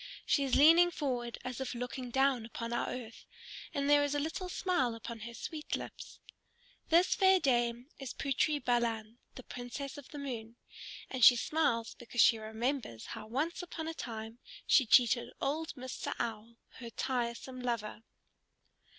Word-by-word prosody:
She 280 Hz, -, +2 dB
is 265 Hz, -2 st, +1 dB
leaning 330 Hz, +4 st, +7 dB
forward 250 Hz, -7 st, -3 dB
as 255 Hz, 0 st, -5 dB
if 260 Hz, -1 st, -3 dB
looking 250 Hz, +1 st, -5 dB
down 265 Hz, -1 st, +2 dB
upon 230 Hz, +1 st, -5 dB
our 240 Hz, -, -1 dB
earth, 240 Hz, -2 st, -8 dB, 0.4 s
and 280 Hz, 0 st, -1 dB
there 290 Hz, 0 st, +6 dB
is 290 Hz, 0 st, 0 dB
a -, -, +1 dB
little 325 Hz, +5 st, -3 dB
smile 350 Hz, -11 st, 0 dB
upon 230 Hz, 0 st, -7 dB
her 235 Hz, +2 st, -7 dB
sweet 305 Hz, +7 st, -4 dB
lips. -, -, -8 dB, 0.7 s
This 340 Hz, +3 st, +5 dB
fair 380 Hz, -2 st, +5 dB
dame 240 Hz, -1 st, +1 dB
is 270 Hz, -2 st, -5 dB
Putri 280 Hz, +2 st, +1 dB
Balan, 235 Hz, -3 st, -1 dB, 0.2 s
the 255 Hz, -, -9 dB
Princess 265 Hz, +5 st, -6 dB
of 280 Hz, -, -13 dB
the 295 Hz, -, -9 dB
Moon, 235 Hz, -5 st, -5 dB, 0.6 s
and 260 Hz, -2 st, -1 dB
she 245 Hz, -, +10 dB
smiles 235 Hz, -4 st, 0 dB
because 240 Hz, 0 st, -8 dB
she 225 Hz, -, +6 dB
remembers 220 Hz, -, -3 dB
how -, -, -8 dB
once 300 Hz, +11 st, -2 dB
upon 335 Hz, -2 st, -6 dB
a 325 Hz, -, -3 dB
time 225 Hz, -4 st, -7 dB, 0.3 s
she 265 Hz, -6 st, +5 dB
cheated 240 Hz, +1 st, +5 dB
old 315 Hz, +3 st, -2 dB
Mr. 255 Hz, -1 st, -5 dB
Owl, 230 Hz, 0 st, -4 dB, 0.2 s
her 235 Hz, -2 st, -7 dB
tiresome 245 Hz, +2 st, -3 dB
lover. 230 Hz, -3 st, -3 dB
250 Hz, 160 wpm, -33 LUFS, 235-290 Hz, 0.7 s, she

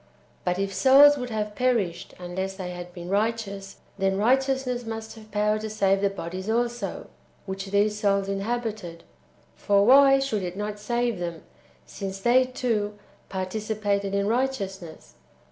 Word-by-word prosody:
But 180 Hz, 0 st, 0 dB
if 195 Hz, 0 st, -2 dB
souls 270 Hz, +8 st, +7 dB
would 250 Hz, -1 st, -4 dB
have^ 210 Hz, -2 st, -3 dB
perished 215 Hz, -9 st, -1 dB
unless 190 Hz, +2 st, -4 dB
they 185 Hz, -2 st, -5 dB
had 175 Hz, 0 st, -8 dB
been 175 Hz, -1 st, -9 dB
righteous, 200 Hz, -1 st, -2 dB, 0.2 s
then 195 Hz, 0 st, +1 dB
righteousness 260 Hz, +2 st, +1 dB
must 225 Hz, -1 st, -6 dB
have 215 Hz, -1 st, -14 dB
power 210 Hz, +1 st, +1 dB
to 220 Hz, 0 st, -5 dB
save 195 Hz, -2 st, +2 dB
the 200 Hz, -, +3 dB
bodies 185 Hz, +1 st, -6 dB
also 240 Hz, +1 st, -1 dB, 0.4 s
[which 190 Hz, 0 st, -5 dB
these 205 Hz, +2 st, +1 dB
souls 200 Hz, -2 st, +1 dB
inhabited]; 200 Hz, -4 st, -3 dB, 0.5 s
for 200 Hz, 0 st, +3 dB
why 270 Hz, +2 st, +7 dB
should 270 Hz, -6 st, -1 dB
it 180 Hz, 0 st, -5 dB
not 210 Hz, 0 st, -4 dB
save 235 Hz, 0 st, -1 dB
them, 170 Hz, -2 st, -5 dB, 0.4 s
since 195 Hz, -, -6 dB
they, 245 Hz, +5 st, +4 dB
too, 220 Hz, -5 st, -2 dB, 0.3 s
participated 200 Hz, +1 st, -2 dB
in 200 Hz, 0 st, +1 dB
righteousness 200 Hz, -8 st, -3 dB
205 Hz, 145 wpm, -26 LUFS, 195-235 Hz, 0.5 s, souls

